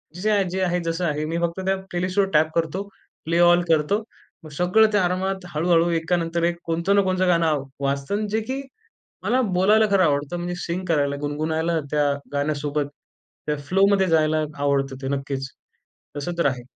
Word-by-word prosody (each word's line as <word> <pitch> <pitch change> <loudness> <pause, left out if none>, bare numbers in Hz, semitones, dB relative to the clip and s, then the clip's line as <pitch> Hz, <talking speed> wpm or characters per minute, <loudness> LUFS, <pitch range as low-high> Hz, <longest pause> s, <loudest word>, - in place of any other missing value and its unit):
जे-जे 205 +4 0
आ 205 -1 +3
जे 190 +1 -2
आहे 180 -1 +1
जसं 165 +2 -1
आहे 150 -1 -1
मी 165 +2 -2
फक्त 170 +1 -1
त्या 190 0 +2 0.2
प्लेलिस्टवर 185 +2 0
टॅप 155 +1 +3
करतो 165 +3 -1 0.4
प्ले 165 +2 +1
ऑल 175 0 +6
करतो. 165 +6 +2 0.4
मग 155 - -10
सगळं 180 +8 +3
त्या 205 -2 +2
आरामात 190 +1 -2
हळू-हळू 170 +1 +3
एकानंतर 165 0 -1
एक 170 0 +1
कोणतं 170 +4 +1
ना 200 - +5
कोणचं 185 0 +1
गाणं 170 -2 +3
आव 150 -3 0 0.2
वाजतं 140 +6 -1
अन् 210 +1 -1
जे 220 +2 0
की 270 +1 -2 0.6
मला 255 - +2 0.2
बोलायला 210 +4 +4
खरं 195 -2 +4
आवडतं 145 +1 0
म्हणजे 175 +1 -3
सिंग 175 +2 -3
करायला 145 -3 +1
गुणगुणायला 160 +3 -1
त्या 145 -1 +2 0.2
गाण्यासोबत, 145 0 -1 0.6
त्या 150 0 0
फ्लोमध्ये 195 +2 +3
जायला 155 -1 +2 0.2
आवडतं 135 -1 +1
ते - - -2
नक्कीच. 135 -1 -4 0.7
तसं 160 +5 -3
तर 170 - +2
आहे. 130 -3 -1
170 Hz, 180 wpm, -23 LUFS, 150-185 Hz, 0.7 s, ऑल